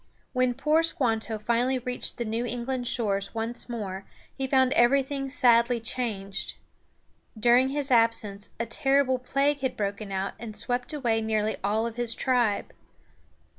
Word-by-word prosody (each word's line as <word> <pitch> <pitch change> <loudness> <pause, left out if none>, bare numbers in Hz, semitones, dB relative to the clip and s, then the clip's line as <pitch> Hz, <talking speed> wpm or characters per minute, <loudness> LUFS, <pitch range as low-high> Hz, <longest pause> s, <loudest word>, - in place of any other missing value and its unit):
When 255 -1 +2
poor 305 +4 +3
Squanto 225 - 0
finally 240 +4 +1
reached 250 0 -4
the 235 - -2
New 225 +2 -1
England 245 +1 -3
shores 200 -3 -1
once 230 +2 -3
more 200 -5 -4 0.3
he 270 - -2
found 260 -1 +3
everything 275 +2 +2
sadly 240 -3 +4
changed. 215 -4 -3 0.8
During 245 +4 +5
his 280 0 -2
absence 225 -4 +2
a 235 - 0
terrible 270 +1 +2
plague 275 +3 +1
had 260 -1 -2
broken 200 0 -3
out 190 0 -2
and 220 -2 -8
swept 245 +5 -2
away 240 -7 0
nearly 220 -1 0
all 215 +3 +1
his 235 0 -1
tribe. 245 -6 +1
240 Hz, 140 wpm, -27 LUFS, 220-260 Hz, 0.8 s, During